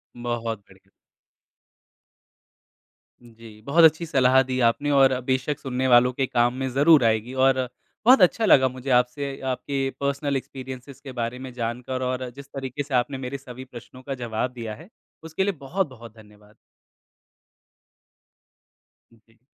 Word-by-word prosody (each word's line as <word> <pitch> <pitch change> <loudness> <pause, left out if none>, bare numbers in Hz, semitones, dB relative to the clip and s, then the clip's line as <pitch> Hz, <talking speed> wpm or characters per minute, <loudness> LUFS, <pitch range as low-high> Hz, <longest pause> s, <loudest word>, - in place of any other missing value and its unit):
बहुत 120 -2 -3
बढ़िया। 95 0 -22 2.3
उम, 120 -1 -17
जी, 115 0 -13 0.2
बहुत 165 +4 +4
अच्छी 160 +2 -8
सलाह 130 0 +5
दी 130 0 -1
आपने 145 +5 -2
और 130 -1 +4
बेशक 135 +3 0
सुनने 130 -1 -2
वालों 125 +1 +6
के 135 +2 0
काम 120 0 +2
में - - -1
ज़रूर 145 +2 +5
आएगी। 110 +3 -3
और 130 -1 +2 0.4
बहुत 250 -3 +7
अच्छा 220 +5 +4
लगा 130 -9 +6
मुझे 130 +2 -6
आपसे 130 +3 -6 0.2
आपके 135 +2 -4 0.2
पर्सनल 140 0 -1
एक्सपीरियंसेज़ 130 +1 -9
के 135 - -8
बारे 115 +2 -3
में - - -9
जानकर। 125 +3 -3
और 130 0 -3
जिस 140 - -10
तरीके 135 +1 -4
से 140 -1 -9
आपने 135 +2 -6
मेरे 140 +2 -5
सभी 130 -1 -10
प्रश्नों 125 +2 -11
का 135 +1 -5
जवाब 115 +2 -2
दिया 110 -2 -5
है, 170 - -15 0.4
उसके 160 +4 -1
लिए 200 - +1
बहुत-बहुत 130 - -4
धन्यवाद। 105 -1 -19 2.6
हुँ, 115 - -23
जी। 115 - -28
130 Hz, 150 wpm, -24 LUFS, 120-140 Hz, 2.6 s, बहुत